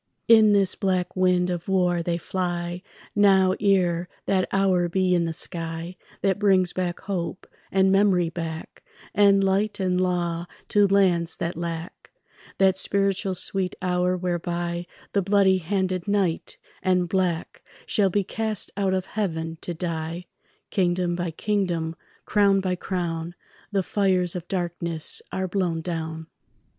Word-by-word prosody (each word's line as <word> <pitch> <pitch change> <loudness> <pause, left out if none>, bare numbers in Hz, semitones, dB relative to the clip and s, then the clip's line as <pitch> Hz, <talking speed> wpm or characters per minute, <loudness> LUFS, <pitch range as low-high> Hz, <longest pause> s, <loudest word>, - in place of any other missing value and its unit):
In 220 -2 +7
this 200 -2 +3
black 185 -2 -1
wind 180 -1 +2
of 175 -1 -4
war 180 -2 +2
they 170 0 -1
fly 175 0 -3 0.3
Now, 190 -2 +5
ere 180 -4 +2 0.2
that 190 -1 +1
hour 185 -3 +2
be 185 +1 +2
in 175 -1 +2
the 165 - -2
sky 165 +1 -5 0.3
That 195 -1 +2
brings 190 -3 +3
back 180 -2 -2
hope, 185 -2 -4 0.3
and 190 0 +3
memory 195 -3 +3
back, 160 -1 -6 0.3
And 200 -1 +5
light 200 +2 +1
and 185 -1 +1
law 175 -2 -1 0.2
to 205 -1 +4
lands 185 -4 +2
that 170 - -3
lack; 170 0 -6 0.5
That 190 -1 +4
spiritual 195 -1 0
sweet 185 0 -1
hour 180 0 +1
whereby 175 -1 -2 0.3
The 200 - +3
bloody 195 -1 +3
handed 185 0 -1
night 195 -5 0 0.2
and 180 -1 +2
black 180 -2 -1 0.2
Shall 200 -2 +2
be 200 +2 +1
cast 220 +1 -3
out 195 -1 +1
of 185 0 -2
heaven 165 -6 -3
to 175 - -4
die; 165 0 -4 0.5
Kingdom 180 -2 +1
by 175 0 -2
kingdom, 170 -3 -1 0.3
crown 200 -2 +3
by 185 -1 -1
crown, 175 -2 -3 0.4
The 195 -2 +1
fires 185 -3 +1
of 175 -1 -5
darkness 170 -3 -1
are 190 0 -2
blown 180 -3 -1
down. 160 -1 -4
180 Hz, 140 wpm, -25 LUFS, 170-195 Hz, 0.5 s, In